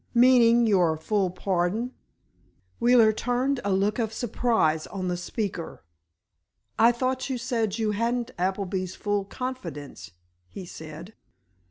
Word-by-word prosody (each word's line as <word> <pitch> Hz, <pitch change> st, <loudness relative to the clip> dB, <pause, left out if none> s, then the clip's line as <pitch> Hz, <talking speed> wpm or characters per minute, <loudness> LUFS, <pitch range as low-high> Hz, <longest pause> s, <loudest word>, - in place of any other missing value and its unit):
"Meaning 240 Hz, -1 st, +6 dB
your 180 Hz, -7 st, +3 dB
full 195 Hz, +3 st, 0 dB
pardon?" 190 Hz, +6 st, -1 dB, 0.9 s
Wheeler 235 Hz, -2 st, +5 dB
turned 250 Hz, +4 st, 0 dB
a 205 Hz, -, 0 dB
look 200 Hz, +4 st, +1 dB
of 220 Hz, -2 st, -1 dB
surprise 220 Hz, -9 st, 0 dB
on 185 Hz, -2 st, -4 dB
the 180 Hz, -, 0 dB
speaker. 175 Hz, -, -5 dB, 1.0 s
"I 230 Hz, +2 st, +7 dB
thought 255 Hz, +2 st, -2 dB
you 260 Hz, -, -1 dB
said 230 Hz, -4 st, -1 dB
you 220 Hz, -2 st, 0 dB
hadn't 235 Hz, +3 st, -1 dB
Appleby's 185 Hz, 0 st, -2 dB
full 205 Hz, -1 st, -1 dB
confidence," 250 Hz, -, -6 dB, 0.4 s
he 185 Hz, -, -8 dB
said. 160 Hz, +4 st, -10 dB
215 Hz, 125 wpm, -26 LUFS, 185-240 Hz, 1.0 s, I